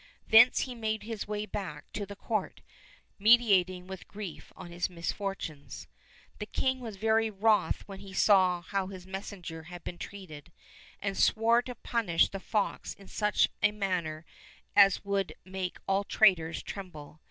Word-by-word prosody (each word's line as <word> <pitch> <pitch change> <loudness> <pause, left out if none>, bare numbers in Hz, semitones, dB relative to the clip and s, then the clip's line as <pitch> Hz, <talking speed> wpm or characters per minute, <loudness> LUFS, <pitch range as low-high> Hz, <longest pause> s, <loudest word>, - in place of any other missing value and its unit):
Thence 225 +3 +7
he 255 - -3
made 220 -2 -2
his 220 -2 -5
way 210 0 -3
back 180 -9 -6
to 205 -1 -4
the 200 - -8
court, 215 -1 -3 0.6
meditating 195 -5 +4
with 190 0 -9
grief 200 -5 -8
on 175 - -10
his 175 +1 -2
misfortunes. 170 -3 -5 0.5
The 210 - -5
king 260 +3 0
was 230 -4 -7
very 220 +2 +2
wroth 215 +1 +2
when 195 -1 -8
he 195 - -11
saw 185 -2 +4
how 195 +2 -2
his 185 -2 -9
messenger 190 -3 -7
had 175 +1 -10
been 175 - -7
treated, 175 -5 -9 0.5
and 195 -1 -2
swore 230 +4 +4
to 250 0 -8
punish 220 -8 +1
the 195 - -6
fox 205 +1 -2
in 195 - -16
such 210 -1 +2
a 210 - +4
manner 180 -6 -2 0.5
as 200 -1 +6
would 200 -1 -1
make 185 -1 -4
all 195 +1 +2
traitors 180 -6 +3
tremble. 155 -6 -9
195 Hz, 155 wpm, -30 LUFS, 180-215 Hz, 0.6 s, Thence